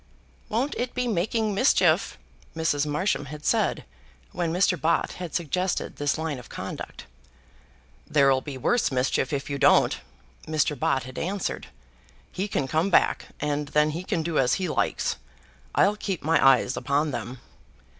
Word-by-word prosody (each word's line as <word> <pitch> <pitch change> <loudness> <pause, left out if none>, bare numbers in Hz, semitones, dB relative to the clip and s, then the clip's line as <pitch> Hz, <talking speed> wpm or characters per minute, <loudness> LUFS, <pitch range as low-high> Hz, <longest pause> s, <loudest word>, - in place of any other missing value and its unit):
"Won't 250 +7 0
it 245 0 -3
be 250 -1 0
making 215 +2 0
mischief?" 255 +8 +3 0.4
Mrs. 150 -3 0
Marsham 150 -1 0
had 150 +2 -9
said - - +1 0.5
when 170 -2 -2
Mr. 180 +2 +3
Bott 165 +1 +1
had 175 -3 -5
suggested 180 +3 -1
this 145 0 0
line 160 -4 -3
of 125 - -13
conduct. - - -7 1.0
"There'll 140 -3 +4
be 140 -2 -7
worse 235 - +1
mischief 130 0 0
if 140 -1 -2
you 140 -1 -3
don't," - - +4 0.5
Mr. 155 -1 +1
Bott 135 -1 +1
had 130 +1 -7
answered. 195 +2 -3 0.6
"He 195 +3 -3
can 140 -9 -1
come 160 +7 +1
back, 180 - +2
and 150 0 -1
then 150 +1 +2
he 170 +4 -5
can 180 -4 -1
do 165 -1 0
as 125 -1 +3
he 185 - -2
likes. 155 - -1 0.6
I'll 205 +2 +3
keep 195 -5 -3
my 160 +2 +3
eyes 135 -1 +5
upon 145 +2 0
them." 120 +1 -5
155 Hz, 155 wpm, -26 LUFS, 140-185 Hz, 1.0 s, eyes